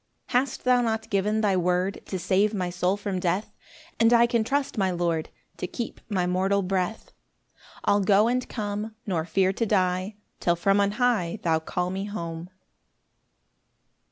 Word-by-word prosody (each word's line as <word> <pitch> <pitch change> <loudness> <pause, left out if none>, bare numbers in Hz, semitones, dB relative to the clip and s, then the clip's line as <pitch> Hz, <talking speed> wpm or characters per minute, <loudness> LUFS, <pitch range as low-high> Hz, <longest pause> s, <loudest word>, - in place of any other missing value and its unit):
4 245 - +4
Hast 270 +2 -4
thou 250 -1 +4
not 225 -1 -2
given 210 +2 +1
thy 200 -3 +2
word 180 +2 0
To 190 - -3
save 200 +4 +1
my 180 -2 -2
soul 180 +2 0
from 200 -2 -3
death? 180 +3 -1 0.5
And 230 0 +5
I 235 0 +6
can 235 -2 +1
trust 275 +4 -1
my 195 -4 +1
Lord 170 -3 -1 0.3
To - - -3
keep 230 +5 -6
my 185 -4 0
mortal 190 +2 +1
breath; 185 +3 -2 0.7
I'll 205 - +4
go 200 +3 +4
and 250 +1 -1
come, 210 0 -4
Nor 170 -5 -1
fear 190 +3 +2
to 230 - -1
die, 185 0 +1 0.2
Till 175 - +2
from 195 +4 +2
on 200 0 +2
high 220 -6 +1
Thou 160 -2 +2
call 180 +3 -2
me 195 +1 -3
home. 170 -4 -5
195 Hz, 170 wpm, -26 LUFS, 180-220 Hz, 0.7 s, I